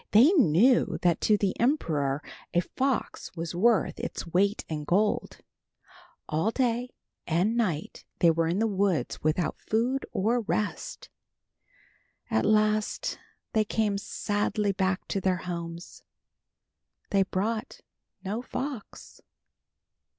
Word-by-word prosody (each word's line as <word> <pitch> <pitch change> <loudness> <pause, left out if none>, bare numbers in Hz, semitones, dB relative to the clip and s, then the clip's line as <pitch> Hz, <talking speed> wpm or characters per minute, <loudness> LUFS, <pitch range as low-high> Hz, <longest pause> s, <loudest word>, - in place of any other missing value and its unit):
They 240 - +8
knew 245 - +4
that 175 -2 +3
to 210 - +4
the 200 -2 0
emperor 155 - +1 0.3
a 175 - +5
fox 260 +8 -2
was 165 0 -4
worth 220 +5 +2
its - - -4
weight 195 +5 +1
in 155 -2 -4
gold. 205 +7 +1 0.9
All 160 +7 +1
day 245 0 -1 0.3
and 180 +7 +1
night 180 -10 -2
they 170 - +5
were 165 0 +1
in 170 +3 0
the 225 - +2
woods 195 -5 0
without 155 +2 0
food 245 +5 0
or 230 +4 +1
rest. - - -3 1.2
At - - +2
last 215 0 +1 0.3
they 220 - +3
came 210 -1 0
sadly 205 0 -1
back 190 -1 -1
to 195 - -1
their 185 -1 +1
homes. 170 -1 -6 1.1
They 195 - +4
brought 210 +4 -2 0.4
no 210 +5 -2
fox. 260 -2 -6
205 Hz, 120 wpm, -28 LUFS, 175-230 Hz, 1.2 s, They